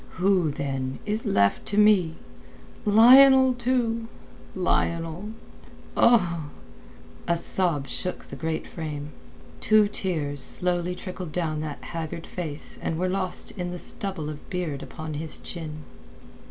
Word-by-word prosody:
"Who, 185 -3 +2
then, 135 -2 -3
is 215 +1 -2
left 100 0 +2
to 205 - -2
me! 200 -6 +4 0.7
Lionel 260 +5 +7
too! 235 -2 -1 0.5
Lionel!" 170 0 -1 0.7
A 180 -9 +4 1.0
sob 165 -5 +2
shook 180 +7 -3
the - - -9
great 160 -1 -3
frame. 150 -3 -6 0.5
Two 215 -1 +4
tears 155 -9 -2
slowly 180 +5 +4
trickled 180 -2 -7
down 155 -3 -2
that 150 -2 -6
haggard 165 0 -6
face 160 -5 -5
and 160 - -2
were 185 +2 -1
lost 185 -1 -2
in 180 -3 -5
the 180 - -5
stubble 175 -4 -4
of 150 -1 -9
beard 175 -7 -3
upon 155 -1 -7
his 155 +2 -4
chin. 155 -3 -7
175 Hz, 125 wpm, -25 LUFS, 155-200 Hz, 1.0 s, Lionel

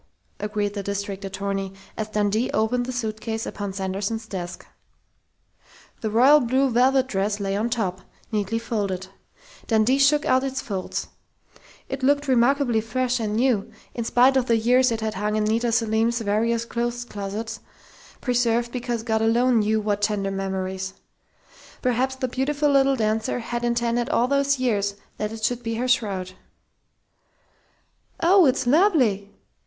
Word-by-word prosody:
agreed 210 0 -2
the 205 - -3
district 200 0 -4
attorney, 195 0 -3 0.2
as 215 - -3
Dundee 210 +2 0
opened 245 +3 +1
the - - -2
suitcase 225 -2 -3
upon 205 -1 -5
Sanderson's 195 +3 -3
desk. 180 -4 -6 1.3
The 220 - -2
royal 260 +7 +6
blue 260 +1 +1
velvet 260 +2 +3
dress 205 -3 -1
lay 195 -1 -1
on 220 +4 0
top, 195 -6 -2 0.3
neatly 210 0 -1
folded. 200 -5 -3 0.6
Dundee 225 +4 +3
shook 290 +2 +4
out 260 +1 +3
its 265 -1 -2
folds. 190 -4 -4 0.8
It 270 0 -5
looked 285 +2 +2
remarkably 250 -2 +3
fresh 250 +3 -1
and 210 -2 -2
new, 235 -4 +1 0.2
in 235 - -3
spite 250 +4 +4
of 255 -1 +1
the 230 - +3
years 250 +3 +3
it 225 -1 -2
had 220 -1 -2
hung 210 +1 -1
in 215 - +1
Nita 230 +2 +1
Selim's 225 +1 +1
various 225 +2 0
clothes 240 +1 -3
closets, 210 +1 -5 0.6
preserved 240 -1 +1
because 240 -2 -3
of - - -14
God 220 -2 +1
alone 235 +2 +3
knew 215 +1 +1
what 205 -1 -1
tender 205 -2 0
memories. 190 0 -3 0.9
Perhaps 255 +1 +1
the 260 0 -2
beautiful 285 +4 0
little 275 -1 +4
dancer 220 -1 0
had 240 0 -4
intended 235 0 0
all 240 - +2
those 280 0 +2
years 205 -6 0 0.2
that 210 0 -3
it 225 -1 -8
should 245 +2 0
be 230 -1 -3
her 245 +3 -1
shroud.... 200 -7 0 1.9
"Oh, 360 -1 +5
it's 255 - +1
lovely!" 250 - +3
225 Hz, 150 wpm, -24 LUFS, 205-250 Hz, 1.9 s, royal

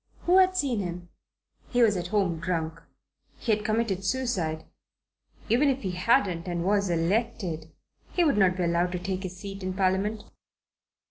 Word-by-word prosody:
Who 360 +2 +5
had 370 0 +4
seen 265 - 0
him? 175 -2 -5 0.6
He 245 -1 +3
was 210 -3 +4
at 175 -1 -3
home 185 -4 0
drunk. 165 -2 -2 0.6
He 230 - -1
had 210 0 +1
committed 215 -3 0
suicide. 190 -10 -1 0.8
Even 250 +6 +3
if 270 -2 -1
he 190 - -1
hadn't, 180 -2 +1
and 175 -1 -2
was 200 -1 +2
elected, 175 -2 -1 0.4
he 355 - +2
would 300 -4 +3
not 185 -2 +4
be 180 - 0
allowed 175 +1 +1
to 180 - -2
take 190 +1 -3
his 185 -1 -6
seat 195 0 -7
in 185 0 -3
Parliament. 195 +3 0
190 Hz, 165 wpm, -27 LUFS, 175-225 Hz, 0.8 s, Who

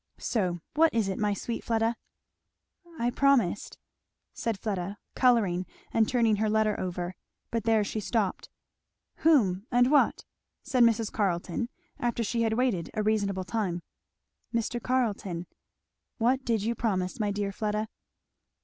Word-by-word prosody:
So 180 -7 -1
what 325 +2 +5
is 215 -4 +2
it, 190 - -3
my 210 -1 +1
sweet 230 +4 -4
Fleda?" 225 0 +1 1.0
"I 240 -1 +1
promised 250 -9 +2 0.3
" - - -56
said 230 -3 -2
Fleda 200 -2 -3 0.2
colouring 205 -8 +3 0.3
and 220 -1 +3
turning 230 -4 +3
her 215 +1 +1
letter 215 -1 +2
over. 180 0 -3 0.4
But 230 -1 -1
there 225 -2 +4
she 210 +2 -3
stopped. 210 -2 -1 0.7
"Whom 220 - +3
and 245 +2 +4
what?" 295 - +3 0.4
said 265 -3 +1
Mrs. 230 -2 +4
Carleton 195 +3 -1 0.3
after 235 -1 0
she 230 +2 -1
had 225 -1 +2
waited 225 -8 0
a 215 - 0
reasonable 200 -3 +1
time. 185 -4 -2 0.7
"Mr. 235 +1 -1
Carleton." 205 -9 -1 0.7
"What 255 +3 +2
did 225 -4 0
you 230 +2 +1
promise, 190 -5 -1
my 210 -1 +1
dear 200 0 -1
Fleda?" 210 +1 -2
220 Hz, 140 wpm, -28 LUFS, 195-235 Hz, 1.0 s, what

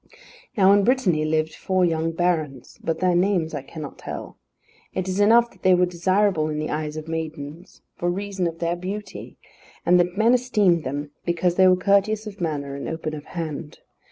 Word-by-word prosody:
Now 195 0 +6
in 200 0 +4
Brittany 195 -11 +2
lived 155 0 0
four 185 +1 +1
young 165 -1 0
barons, 160 -6 -2
but 165 -1 -1
their 185 -1 +3
names 175 -3 +1
I 145 - -3
cannot 150 +1 -9
tell. - - -7 0.6
It 185 0 -2
is 190 +1 -2
enough 235 +3 +5
that - - -23
they 185 -1 +5
were 180 0 +4
desirable 180 -1 +1
in 150 - -3
the 155 0 -3
eyes 150 0 -3
of 155 0 -7
maidens 160 +1 -6
for 175 - -1
reason 195 0 -2
of 165 -1 -5
their 170 +1 -1
beauty, 195 +4 -7 0.5
and 180 +1 +5
that 175 +1 0
men 225 +3 +4
esteemed 210 -9 +2
them 145 +2 -4
because 170 0 +1
they 185 +1 +5
were 185 0 +5
courteous 200 +3 +2
of 205 -2 -9
manner 145 -4 -2
and 140 - -5
open 160 -1 -4
of 150 -1 -7
hand. 155 -3 -6
175 Hz, 190 wpm, -23 LUFS, 155-195 Hz, 0.6 s, Now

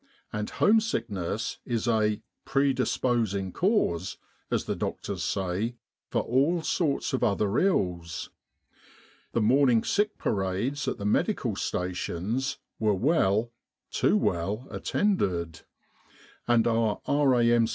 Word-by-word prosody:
And 105 -1 -2
home 220 +2 +4
sickness 115 - -3
is 120 -1 -2
a 110 -2 +1
<( - - -56
pre 140 0 +2
disposing 115 -6 0
cause,*' 160 - 0 0.3
as - - 0
the - - -2
doctors - - -4
say, 95 +5 -1 0.3
for - - 0
all 150 +7 +2
sorts 155 -7 0
of 130 - 0
other 105 -1 +2
ills. 90 - 0 1.0
The 115 - +2
morning 125 0 +4
sick 210 +1 0
parades 105 +8 -1
at - - -1
the 100 - -5
medical 105 - +1
stations 90 +7 -2 0.2
were 105 -2 +2
well, 115 - +2 0.4
too - - +3
well, 100 +9 -1
attended; 90 - 0 0.9
and 120 -1 +4
ouf 115 -2 +1
R.A.M. 120 -5 +4
115 Hz, 120 wpm, -27 LUFS, 100-135 Hz, 1.0 s, home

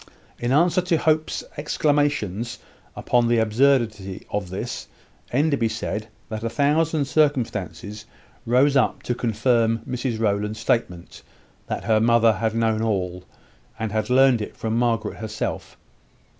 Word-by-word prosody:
In 120 +1 -1
answer 170 +6 +3
to 175 -2 +1
Hope's 155 -1 0
exclamations 145 - 0 0.4
upon 120 -1 +1
the 120 0 +3
absurdity 110 -4 +1
of 100 -3 -2
this, 95 - -5 0.4
Enderby 140 -3 +1
said, 110 0 -4 0.2
that 110 -1 -5
a 115 - -1
thousand 150 +3 +1
circumstances 110 - -1 0.4
rose 130 +4 +3
up 135 - +1
to 120 - -1
confirm 115 -1 +1
Mrs 125 -2 -2
Rowland's 105 0 -1
statement 90 -7 -2 0.5
that - - -3
her 110 -1 +3
mother 115 0 +4
had 110 +2 -2
known 110 -1 +1
all, 90 -5 -2 0.5
and 110 -2 -3
had 110 +1 -1
learned 130 -2 +5
it 105 - -7
from 110 0 -2
Margaret 115 -3 0
herself. 110 -1 -5
115 Hz, 130 wpm, -23 LUFS, 110-135 Hz, 0.5 s, learned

